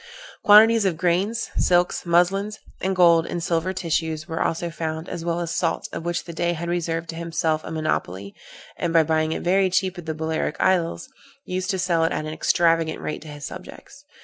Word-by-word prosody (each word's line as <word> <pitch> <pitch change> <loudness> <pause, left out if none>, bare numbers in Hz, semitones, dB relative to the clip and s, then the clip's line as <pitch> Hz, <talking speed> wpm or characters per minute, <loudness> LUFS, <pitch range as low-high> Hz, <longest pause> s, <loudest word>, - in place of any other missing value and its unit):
Quantities 220 +2 +7
of 180 -4 0
grain, 180 +5 +1
silks, 175 -5 0
muslins, 195 +5 +2 0.2
and 190 0 0
gold 170 -2 +5
and 175 - -4
silver 170 +2 0
tissues 160 -3 -2
were 160 -2 -3
also 170 +1 -1
found, 160 +1 -4
as 170 -2 -6
well 170 0 -1
as 170 -1 -3
salt, - - -1
of - - -5
which 175 0 -2
the 170 - -9
Dey 175 +1 0
had 170 +1 -5
reserved 170 -1 -2
to 165 - -5
himself 165 -1 -1
a - - -7
monopoly, 100 - -3 0.4
and, 170 - -2
by 165 -1 +6
buying 155 0 0
it - - -3
very 190 +2 +3
cheap 190 -1 0
at 170 - -10
the 160 - -2
Balearic 160 -1 -2
Isles, 180 +5 +1 0.4
used 185 0 -3
to 190 - 0
sell 175 -2 +1
it 165 - +1
at 155 - -2
an 155 - -5
extravagant 165 -1 +1
rate 155 - -5
to 160 - -12
his 145 -1 -8
subjects. 185 +9 -11
170 Hz, 200 wpm, -23 LUFS, 160-180 Hz, 0.4 s, Quantities